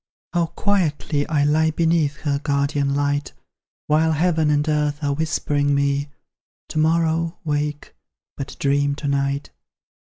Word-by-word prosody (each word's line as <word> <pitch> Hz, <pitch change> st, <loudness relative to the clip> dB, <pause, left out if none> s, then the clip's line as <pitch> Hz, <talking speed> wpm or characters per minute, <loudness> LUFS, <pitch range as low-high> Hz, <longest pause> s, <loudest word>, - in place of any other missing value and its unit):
How 170 Hz, -1 st, +2 dB
quietly 160 Hz, -7 st, 0 dB
I 150 Hz, -3 st, +2 dB
lie 155 Hz, +2 st, +3 dB
beneath 160 Hz, -2 st, +1 dB
her 140 Hz, -2 st, 0 dB
guardian 140 Hz, -1 st, 0 dB
light; 145 Hz, 0 st, -1 dB, 0.5 s
While 160 Hz, +1 st, +3 dB
heaven 160 Hz, -1 st, +2 dB
and 150 Hz, +1 st, +2 dB
earth 150 Hz, -1 st, 0 dB
are 140 Hz, -1 st, +1 dB
whispering 145 Hz, -2 st, 0 dB
me, 140 Hz, 0 st, 0 dB, 0.6 s
"To 155 Hz, -, -2 dB
morrow, 165 Hz, +1 st, +1 dB
wake, 150 Hz, -1 st, -2 dB, 0.4 s
but 135 Hz, -, -6 dB
dream 140 Hz, 0 st, +1 dB
to 145 Hz, -, -5 dB
night." 140 Hz, 0 st, -1 dB
150 Hz, 130 wpm, -22 LUFS, 145-160 Hz, 0.6 s, lie